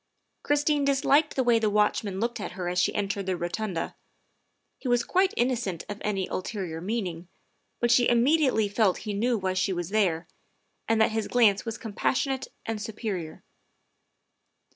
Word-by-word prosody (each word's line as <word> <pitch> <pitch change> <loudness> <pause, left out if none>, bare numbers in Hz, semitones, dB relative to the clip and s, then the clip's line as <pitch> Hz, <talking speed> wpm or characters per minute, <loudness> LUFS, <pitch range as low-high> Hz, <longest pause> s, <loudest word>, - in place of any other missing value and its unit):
Christine 290 0 +1
disliked 280 +2 +3
the 260 - +2
way 240 -2 +4
the 215 -1 +1
watchman 210 -1 +1
looked 235 +2 -1
at 200 - -5
her 180 -1 -4
as 180 0 0
she - - +3
entered 200 -1 -2
the 185 -1 0
rotunda; 175 +1 -3 0.8
he - - -6
was 245 -1 +3
quite 375 +7 +2
innocent 240 -8 0
of 205 0 -7
any 195 -3 -1
ulterior 185 -5 -4
meaning, 180 -4 -3 0.5
but 240 -1 +2
she 245 -1 +5
immediately 250 -2 +3
felt 200 -2 +2
he 210 - -2
knew 235 +4 +1
why 190 -2 -1
she 190 +1 0
was 175 -1 -3
there, 185 -6 +1 0.6
and 225 0 +3
that 220 - +4
his 220 0 -1
glance 220 -5 +3
was 225 -1 -4
com 220 -3 -8
passionate 265 +4 0 0.2
and 220 -2 -3
superior. 205 -7 -5
215 Hz, 165 wpm, -27 LUFS, 190-240 Hz, 0.8 s, she